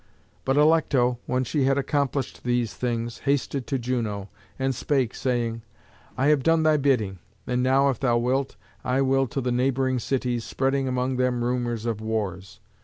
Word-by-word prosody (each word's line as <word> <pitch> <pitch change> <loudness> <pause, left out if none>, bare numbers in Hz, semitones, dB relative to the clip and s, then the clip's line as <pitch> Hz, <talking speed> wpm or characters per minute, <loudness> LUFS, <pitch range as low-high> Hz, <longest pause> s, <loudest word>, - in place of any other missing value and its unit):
But 135 +1 +1
Alecto, 145 -6 +3
when 130 +1 +1
she 135 +2 0
had 135 +1 +2
accomplished 140 -1 -1
these 120 -4 0
things, 115 +1 -3
hasted 140 -1 -1
to 135 - 0
Juno, 115 -5 -3 0.3
and 135 0 0
spake, 130 -2 0
saying, 120 -3 -1 0.6
"I 130 - +1
have 150 -2 +4
done 165 +2 +3
thy 155 -1 +4
bidding; 115 -10 +1 0.3
and 125 0 0
now, 135 +2 +3
if 125 - -6
thou 120 -3 +2
wilt, 130 +3 0 0.3
I 130 +2 +1
will 135 0 +2
to 135 - -3
the 125 0 -1
neighbouring 130 +1 +1
cities, 125 -1 -1
spreading 135 +2 0
among 130 0 -1
them 125 -1 +1
rumours 120 -2 -1
of 115 -2 -2
wars." 100 -5 -3
125 Hz, 170 wpm, -25 LUFS, 120-135 Hz, 0.6 s, have